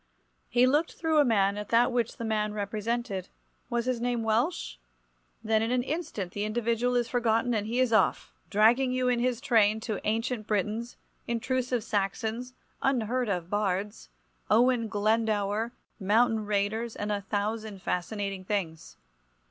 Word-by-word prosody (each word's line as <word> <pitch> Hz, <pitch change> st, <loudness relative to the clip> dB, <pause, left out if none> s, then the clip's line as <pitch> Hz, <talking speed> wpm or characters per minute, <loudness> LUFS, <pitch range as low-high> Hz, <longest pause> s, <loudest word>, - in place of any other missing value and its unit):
He 245 Hz, +1 st, +4 dB
looked 295 Hz, +6 st, +2 dB
through 320 Hz, -2 st, +1 dB
a -, -, +7 dB
man 205 Hz, -5 st, +2 dB
at 210 Hz, -, -7 dB
that 240 Hz, +2 st, +4 dB
which 240 Hz, -2 st, -1 dB
the 230 Hz, -, -4 dB
man 215 Hz, -1 st, 0 dB
represented. 210 Hz, -1 st, -3 dB, 0.4 s
Was 240 Hz, -1 st, -1 dB
his 250 Hz, -2 st, -1 dB
name 240 Hz, -1 st, 0 dB
Welsh? 225 Hz, -, 0 dB, 0.7 s
Then 220 Hz, 0 st, +2 dB
in 225 Hz, -, 0 dB
an 250 Hz, 0 st, +1 dB
instant 265 Hz, -, -4 dB
the 205 Hz, -, -3 dB
individual 235 Hz, +3 st, 0 dB
is 240 Hz, -1 st, +2 dB
forgotten 240 Hz, 0 st, +1 dB
and 210 Hz, -1 st, -1 dB
he 235 Hz, +3 st, -1 dB
is 255 Hz, -3 st, +2 dB
off, 215 Hz, -3 st, +2 dB, 0.2 s
dragging 240 Hz, +5 st, +4 dB
you 255 Hz, 0 st, +1 dB
in 245 Hz, -1 st, +2 dB
his 245 Hz, -1 st, 0 dB
train, 220 Hz, -3 st, +3 dB
to 220 Hz, -3 st, -3 dB
ancient 225 Hz, 0 st, -1 dB
Britons, 215 Hz, +3 st, -2 dB, 0.3 s
intrusive 245 Hz, 0 st, -1 dB
Saxons, 225 Hz, +4 st, -2 dB, 0.3 s
unheard 250 Hz, -2 st, 0 dB
of 180 Hz, -3 st, -2 dB
bards, 205 Hz, -, -2 dB, 0.4 s
Owen 240 Hz, 0 st, +4 dB
Glendower, 215 Hz, 0 st, 0 dB, 0.3 s
mountain 220 Hz, +2 st, +2 dB
raiders 210 Hz, +3 st, -1 dB
and 205 Hz, +1 st, -3 dB
a 205 Hz, -1 st, -1 dB
thousand 205 Hz, 0 st, -3 dB
fascinating 195 Hz, +1 st, -2 dB
things. 180 Hz, -5 st, -4 dB
225 Hz, 150 wpm, -28 LUFS, 205-245 Hz, 0.7 s, a